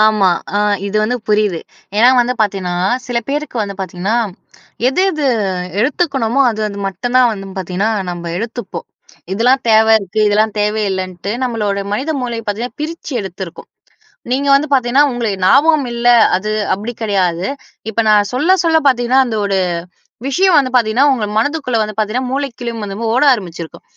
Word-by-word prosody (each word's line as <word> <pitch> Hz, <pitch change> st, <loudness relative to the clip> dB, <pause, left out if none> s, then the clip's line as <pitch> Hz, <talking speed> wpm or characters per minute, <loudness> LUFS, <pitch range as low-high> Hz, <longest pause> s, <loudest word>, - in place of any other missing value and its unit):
ஆமா. 215 Hz, -3 st, +4 dB, 0.3 s
அ -, -, +2 dB, 0.3 s
இது 205 Hz, +2 st, -2 dB
வந்து 240 Hz, +4 st, 0 dB
புரியுது 210 Hz, -5 st, +1 dB, 0.4 s
ஏன்னா 235 Hz, +3 st, +6 dB
வந்து 245 Hz, +1 st, 0 dB
பாத்தீங்கன்னா, 195 Hz, -4 st, 0 dB, 0.3 s
சில 245 Hz, -1 st, -1 dB
பேருக்கு 295 Hz, -1 st, -3 dB
வந்து 200 Hz, -1 st, -5 dB
பாத்தீங்கன்னா, 190 Hz, +4 st, -2 dB, 0.7 s
எது 270 Hz, +7 st, 0 dB
எது 305 Hz, -4 st, -2 dB, 0.5 s
எடுத்துக்கணுமோ 270 Hz, -2 st, 0 dB
அது 220 Hz, -1 st, -5 dB
அது 200 Hz, -1 st, -7 dB
மட்டும் 220 Hz, +7 st, -5 dB
தான் 250 Hz, -1 st, +5 dB
வந்து 195 Hz, -2 st, -7 dB
பாத்தீங்கன்னா 190 Hz, +4 st, -1 dB, 0.2 s
நம்ப 175 Hz, -1 st, -6 dB
எடுத்துப்போம். 230 Hz, 0 st, -6 dB, 0.5 s
இதெல்லாம் 250 Hz, +6 st, +2 dB
தேவ 220 Hz, 0 st, +5 dB
இருக்கு 195 Hz, +1 st, -4 dB
இதெல்லாம் 215 Hz, +1 st, +1 dB
தேவ 210 Hz, +1 st, +1 dB, 0.2 s
இல்லைன்ட்டு 185 Hz, +1 st, -4 dB
நம்மளோட 210 Hz, -5 st, -1 dB
மனித 265 Hz, +9 st, -2 dB
மூளை 240 Hz, -2 st, -3 dB
பாத்தீங்கன்னா 225 Hz, +4 st, -4 dB
பிரிச்சு 315 Hz, -1 st, -5 dB
எடுத்ருக்கோம். 190 Hz, -2 st, -8 dB, 0.6 s
நீங்க 275 Hz, +3 st, 0 dB
வந்து 285 Hz, +3 st, +2 dB
பாத்தீங்கன்னா, 260 Hz, +1 st, +3 dB
உங்களுக்கு 230 Hz, -5 st, -2 dB
ஞாபகம் 285 Hz, -, +4 dB
இல்ல. 235 Hz, 0 st, -3 dB, 0.3 s
அது 210 Hz, +3 st, -3 dB, 0.2 s
அப்படி 215 Hz, +5 st, -5 dB
கிடையாது. 185 Hz, -4 st, 0 dB, 0.4 s
இப்ப 220 Hz, -, -11 dB
நான் 205 Hz, -1 st, +4 dB
சொல்ல 295 Hz, +9 st, +2 dB
சொல்ல 325 Hz, -1 st, +4 dB
பாத்தீங்கன்னா 250 Hz, 0 st, +3 dB
அந்த 225 Hz, -3 st, -3 dB
ஒரு 195 Hz, -1 st, 0 dB, 0.7 s
விஷயம் 360 Hz, +6 st, +3 dB
வந்து 260 Hz, -2 st, +1 dB
பாத்தீங்கன்னா 240 Hz, +3 st, +3 dB
உங்க 230 Hz, -5 st, -1 dB
மனதுக்குள்ள 275 Hz, +1 st, 0 dB
வந்து 215 Hz, 0 st, -4 dB
பாத்தீங்கன்னா 235 Hz, +4 st, -1 dB
மூளைக்குள்ளயும் 240 Hz, -5 st, -4 dB
வந்து 195 Hz, -1 st, -6 dB, 0.2 s
ஓட 255 Hz, -, +2 dB
ஆரம்பிச்சிருக்கும். 170 Hz, -, -5 dB
225 Hz, 155 wpm, -16 LUFS, 200-255 Hz, 0.7 s, ஏன்னா